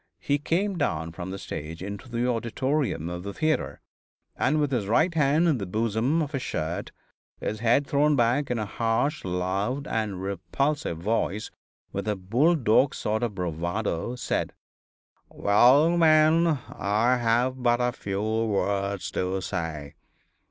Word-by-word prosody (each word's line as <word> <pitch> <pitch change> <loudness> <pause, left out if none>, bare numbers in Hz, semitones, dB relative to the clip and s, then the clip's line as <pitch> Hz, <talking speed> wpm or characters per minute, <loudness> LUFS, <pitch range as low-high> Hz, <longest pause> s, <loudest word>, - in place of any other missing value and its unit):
He 145 0 0
came 180 +5 -1
down 80 - -1
from 90 +2 -7
the 95 - -5
stage 80 -2 -6
into 100 +5 -7
the 120 +1 -1
auditorium 125 - -1
of 90 0 -5
the 100 +2 -7
theatre, 155 -1 -1 0.5
and 155 +2 +1
with 145 -2 0
his 115 -7 -1
right 155 - +3
hand 155 +2 +3
in 150 -7 +2
the 100 - -4
bosom 115 - 0
of 145 - -5
his 135 -4 -2
shirt, 80 -4 -3 0.5
his 110 - -3
head 120 +5 +3
thrown 145 +1 +2
back, 130 +3 +2
in 125 - 0
a 110 - -2
harsh, 115 - -1
loud 95 +9 -2
and 105 -4 -2
repulsive 100 - -2
voice, 105 +3 -1 0.4
with - - -4
a 105 - +1
bull 120 - +2
dog 130 0 +3
sort 110 +1 -1
of 115 -4 -2
bravado, 90 +5 -2
said: 125 - -2 0.8
"Well, 130 +11 +4
men, 160 0 +5
I 120 -5 0
have 120 +2 +1
but 120 -1 +3
a 125 0 +1
few 100 -3 -4
words 100 -3 -1
to 95 +1 -1
say. 80 -7 -4
115 Hz, 150 wpm, -26 LUFS, 100-140 Hz, 0.8 s, men